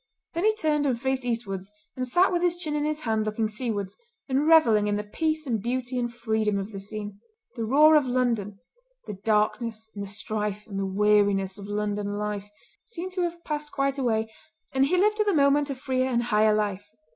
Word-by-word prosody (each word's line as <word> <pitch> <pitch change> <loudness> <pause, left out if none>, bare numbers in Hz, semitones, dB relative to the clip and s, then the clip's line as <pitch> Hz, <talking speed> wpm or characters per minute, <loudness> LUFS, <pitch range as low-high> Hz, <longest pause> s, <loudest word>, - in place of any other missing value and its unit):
Then 340 +4 -1
he 435 0 +4
turned 300 -6 +1
and 245 -3 0
faced 265 0 -1
eastwards 205 -5 -3 0.2
and 255 0 -3
sat 355 +10 +3
with 345 - +1
his 350 -1 +2
chin 310 -4 -3
in 295 0 0
his 305 0 -2
hand 220 -4 0
looking 215 +1 -1
seawards, 210 -3 -3 0.3
and 275 +2 +1
revelling 230 -11 +5
in 205 - +1
the 210 - -2
peace 310 +8 -2
and 230 -6 -1
beauty 250 +2 -2
and 240 -1 -2
freedom 220 -3 0
of 200 +2 -4
the 200 - -6
scene. 205 0 -6 0.4
The 230 -3 -2
roar 300 +6 +6
of 295 -3 +4
London—the 250 - -3
darkness 220 +1 0
and 200 - -6
the - - -6
strife 210 0 -3
and 195 -2 -4
weariness 205 -2 +2
of 200 - -8
London 205 0 -2
life—seemed 210 - -7
to 370 0 -2
have 345 -1 -3
passed 295 -1 -4
quite 275 0 -1
away, 220 -3 0 0.4
and 270 0 +3
he 365 +5 +2
lived 425 +3 +2
at 425 - +2
the 400 - +3
moment 285 0 +3
a 275 - -2
freer 260 0 -1
and 240 -1 +1
higher 215 -2 +3
life. 205 -1 -2
235 Hz, 200 wpm, -26 LUFS, 210-295 Hz, 0.4 s, roar